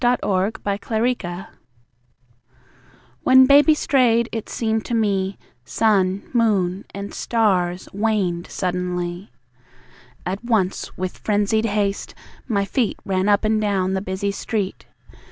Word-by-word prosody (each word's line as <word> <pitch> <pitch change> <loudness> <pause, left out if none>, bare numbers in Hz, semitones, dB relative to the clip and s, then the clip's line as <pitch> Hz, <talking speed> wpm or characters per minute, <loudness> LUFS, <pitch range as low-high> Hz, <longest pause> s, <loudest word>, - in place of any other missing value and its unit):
When 215 -5 +1
Baby 220 +4 0
Strayed 175 -5 -7 1.7
When 260 0 +7
Baby 285 +3 +6
strayed, 240 -5 +2
it 225 -2 -5
seemed 220 -1 -1
to 240 - -2
me, 200 -3 0 0.3
Sun, 195 - +1
moon 200 -5 +1
and 200 0 -7
stars 185 -6 0
waned 195 -5 0
suddenly. 180 0 -3 1.0
At 190 +4 -3
once, 215 -6 -1
with 185 0 -4
frenzied 210 +1 +1
haste, 205 -2 -1 0.3
my 200 -4 0
feet 235 +2 -1
Ran 190 +1 0
up 205 +1 +3
and 215 0 +2
down 190 -3 0
the 190 - -1
busy 190 +1 -2
street. 200 -1 -3
200 Hz, 120 wpm, -21 LUFS, 185-225 Hz, 1.7 s, When